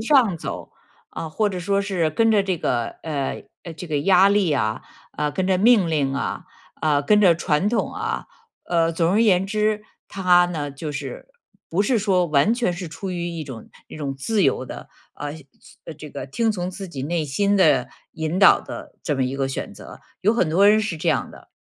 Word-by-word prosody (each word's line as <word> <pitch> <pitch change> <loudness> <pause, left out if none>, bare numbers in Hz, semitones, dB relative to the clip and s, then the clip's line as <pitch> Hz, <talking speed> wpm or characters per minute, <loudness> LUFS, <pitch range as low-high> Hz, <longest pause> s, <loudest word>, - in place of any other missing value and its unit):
上 235 - +4
走。 - - -6 0.4
啊， 160 - -6
或 210 +5 +1
者 185 -2 -4
说 200 +3 0
是 185 -6 0
跟 225 +7 +2
着 205 -2 +4
这 185 -4 -2
个， 120 -5 -1
呃， 145 -4 -3 0.3
这 175 +3 -8
个 155 -2 -2
压 195 +4 +5
力 200 -6 +2
啊， 110 -6 -1 0.3
呃， 150 0 0
跟 185 -1 -1
着 190 -1 +3
命 210 -2 +4
令 140 -4 0
啊， 140 - -3 0.4
啊， 150 -2 +3
跟 210 +7 +4
着 175 -3 +6
传 165 +3 0
统 225 -4 -1
啊。 445 +2 -3 0.4
呃， 165 -1 +1
总 165 +1 +1
而 220 +3 +4
言 190 -3 +3
之， 210 +1 0 0.3
他 180 -2 +4
呢 150 -5 -4
就 150 +2 -6
是 140 - -6 0.4
不 175 +4 0
是 230 +2 +2
说 185 -4 +2
完 155 +8 +3
全 235 -6 0
是 175 0 -6
出 185 +4 -6
于 175 -1 -3
一 165 -2 -5
种 125 -6 -10 0.2
一 - - -10
种 140 -3 -4
自 200 +9 0
由 130 -2 +1
的， - - -9 0.2
呃， 145 0 -5 0.6
这 150 -1 -10
个 - - -6
听 225 - 0
从 180 -2 -3
自 190 +1 -7
己 140 -6 -7
内 165 0 -1
心 200 +8 +1
的 140 -9 +4 0.2
引 160 +3 -3
导 195 - +7
的 - - -9
这 150 - -1
么 130 -1 0
一 130 +2 -3
个 135 -1 -1
选 135 - -5
择， - - -12 0.2
有 215 +4 +3
很 180 -9 +1
多 195 +5 +5
人 215 +1 +5
是 175 -6 -3
这 - - -1
样 - - 0
的。 - - -15
175 Hz, 220 characters per minute, -22 LUFS, 150-200 Hz, 0.6 s, 导